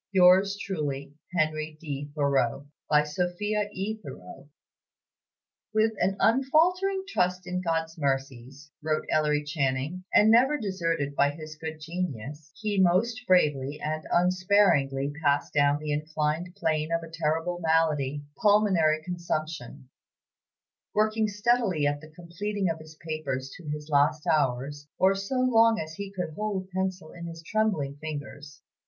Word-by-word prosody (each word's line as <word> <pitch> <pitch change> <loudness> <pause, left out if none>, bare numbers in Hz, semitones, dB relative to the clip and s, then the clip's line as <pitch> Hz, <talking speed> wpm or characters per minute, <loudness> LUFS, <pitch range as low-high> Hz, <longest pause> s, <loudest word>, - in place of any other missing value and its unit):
"Yours 190 +1 +5
truly, 145 -7 -4 0.2
HENRY 155 -1 0
D. 145 -2 -5
THOREAU, 140 -2 +1 0.2
"By 150 0 +5
SOPHIA 185 +7 -1
E. 210 +3 -4
THOREAU." - - -11 1.3
"With 220 +1 +3
an 190 +2 +1
unfaltering 345 - +3
trust 180 - 0
in 180 0 -2
God's 165 -1 -2
mercies," 135 0 -3
wrote 155 0 -1
Ellery 150 -1 +2
Channing, 145 +3 -2
"and 215 +1 +6
never 260 +6 +5
deserted 165 - -2
by 140 - +4
his 155 +1 -8
good 160 0 -6
genius, 150 -3 -5
he 210 -3 0
most 225 +7 +2
bravely 145 -6 +2
and 155 +1 -3
unsparingly 175 -7 +3
passed 145 0 +1
down 145 0 +3
the 150 0 -4
inclined 155 +3 -2
plane 155 -4 -1
of 165 0 0
a - - -8
terrible 165 +2 -1
malady 155 -4 +1 0.2
pulmonary 190 -7 +4
consumption; 155 -6 -4 1.1
working 215 +1 +2
steadily 205 -6 +1
at 145 0 0
the 155 - -12
completing 175 +4 -3
of 160 - -6
his 155 0 -13
papers 145 -5 -4
to 165 -4 -9
his 150 0 -5
last 150 +1 +2
hours, 145 0 0
or 190 +1 +4
so 195 +6 -4
long 230 -3 +4
as 160 0 -5
he 200 +4 -6
could 180 -4 -4
hold 205 +1 -2
the 185 - -21
pencil 185 -3 -2
in 170 -1 -8
his 165 0 -9
trembling 190 -9 0
fingers. 145 -1 -8
160 Hz, 140 wpm, -27 LUFS, 150-190 Hz, 1.3 s, and